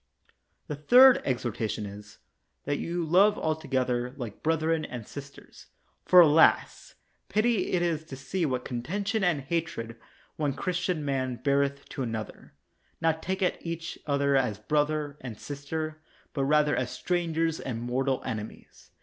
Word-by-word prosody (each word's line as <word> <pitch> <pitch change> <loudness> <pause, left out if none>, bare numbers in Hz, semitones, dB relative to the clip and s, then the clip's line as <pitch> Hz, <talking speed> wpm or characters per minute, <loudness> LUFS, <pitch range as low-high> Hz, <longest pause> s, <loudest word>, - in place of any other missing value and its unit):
The 150 - -4
third 250 - +7
exhortation 115 -4 -2
is: 100 +1 -10 0.5
That 145 0 -1
you 170 0 -2
love 195 +6 +4
alto 160 0 -2
gether 125 -2 0
like 120 -6 -7
brethren 160 0 +1
and 120 -6 -6
sisters. 140 0 -11 0.4
For, 180 -1 +9
alas! 160 0 +4 0.3
pity 215 -2 +2
it 175 -1 +2
is 165 -3 0
to 140 - -8
see 135 +8 -3
what 130 -5 -1
contention 200 - -2
and 175 -6 +2
hatred 135 -6 -3 0.4
one 145 -3 0
Chris 180 +5 -2
tian 170 -6 -1
man 130 -2 -1
beareth 140 +1 0
to - - -5
another, 115 -3 -6 0.4
not 160 -1 +1
taking 190 -1 0
each 165 0 -5
other 140 -1 +2
as 125 -7 +1
brother 150 +5 -1
and 120 -5 -7
sister, 155 +2 -5 0.3
but 135 -2 0
rather 150 +1 +3
as 125 -1 -1
stran 175 -3 -2
gers 165 0 0
and 120 -4 -4
mortal 130 +2 -1
enemies. 110 -1 -7
145 Hz, 150 wpm, -28 LUFS, 130-165 Hz, 0.5 s, For